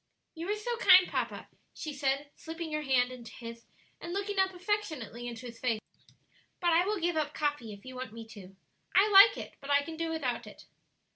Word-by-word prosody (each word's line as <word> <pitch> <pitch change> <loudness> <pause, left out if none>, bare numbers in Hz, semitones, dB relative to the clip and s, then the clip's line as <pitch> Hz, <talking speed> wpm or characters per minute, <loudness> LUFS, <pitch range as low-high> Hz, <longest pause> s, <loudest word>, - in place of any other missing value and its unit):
"You 335 +3 -6
are 415 - +1
so 470 +3 -3
kind, 370 -4 +7
papa," - - -3 0.3
she 310 - -5
said, 280 +1 -1
slipping 325 -1 -6
her 305 - 0
hand 255 -3 +2
into 240 -3 -10
his 230 -1 -9 0.3
and 345 - -6
looking 400 0 -2
up 380 0 +3
affectionately 350 - -3
into 235 +1 -7
his 235 -1 -9
face. 230 -4 0 0.8
"But 345 -2 +2
I 335 +2 +5
will 420 -1 0
give 345 0 0
up 300 -1 -1
coffee 290 -7 -1
if 200 +2 -12
you 260 - -8
want 255 -2 -6
me 225 0 -9
to. 195 -3 -12 0.4
I 395 +2 +7
like 400 +3 +9
it, - - -8
but 280 - -9
I 285 0 +4
can 320 +1 -7
do 330 0 -2
without 275 -7 -2
it." - - -13
295 Hz, 210 wpm, -31 LUFS, 245-360 Hz, 0.8 s, like